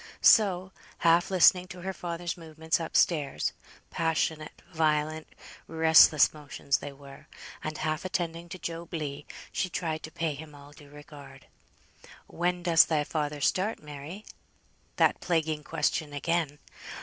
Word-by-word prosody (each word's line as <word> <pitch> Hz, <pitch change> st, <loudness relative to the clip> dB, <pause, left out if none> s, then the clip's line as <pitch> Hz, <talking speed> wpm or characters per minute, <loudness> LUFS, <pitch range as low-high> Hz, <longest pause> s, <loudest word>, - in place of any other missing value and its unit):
So 190 Hz, -4 st, +5 dB, 0.3 s
half 170 Hz, +1 st, +4 dB
listening 185 Hz, -1 st, +5 dB
to 185 Hz, -1 st, -10 dB
her 190 Hz, +2 st, -4 dB
father's 175 Hz, -1 st, -4 dB
movements 160 Hz, -1 st, -2 dB
up 165 Hz, -, -1 dB
stairs, 150 Hz, -5 st, +1 dB, 0.4 s
(passionate, 160 Hz, -1 st, -2 dB
violent, 155 Hz, 0 st, 0 dB, 0.4 s
restless 160 Hz, -2 st, +6 dB
motions 145 Hz, -2 st, -2 dB
they 145 Hz, -, -7 dB
were) 140 Hz, 0 st, -14 dB, 0.4 s
and 155 Hz, 0 st, -4 dB
half 155 Hz, 0 st, -2 dB
attending 170 Hz, -2 st, -3 dB
to 185 Hz, -, -7 dB
Job 170 Hz, 0 st, -6 dB
Legh, 145 Hz, -2 st, -5 dB, 0.3 s
she 185 Hz, -, -1 dB
tried 160 Hz, -2 st, -3 dB
to -, -, -8 dB
pay 160 Hz, -2 st, -2 dB
him 150 Hz, +1 st, -11 dB
all 145 Hz, 0 st, -14 dB
due 145 Hz, -1 st, -16 dB
regard. 145 Hz, -2 st, -13 dB, 0.8 s
"When 175 Hz, +1 st, -2 dB
does 170 Hz, -1 st, +6 dB
thy 155 Hz, -2 st, 0 dB
father 150 Hz, -1 st, -3 dB
start, 190 Hz, +7 st, 0 dB
Mary?" 150 Hz, +7 st, -9 dB, 0.7 s
That -, -, +2 dB
plaguing 160 Hz, -3 st, -1 dB
question 150 Hz, -1 st, -1 dB
again. 155 Hz, 0 st, -1 dB
160 Hz, 135 wpm, -28 LUFS, 150-170 Hz, 0.8 s, restless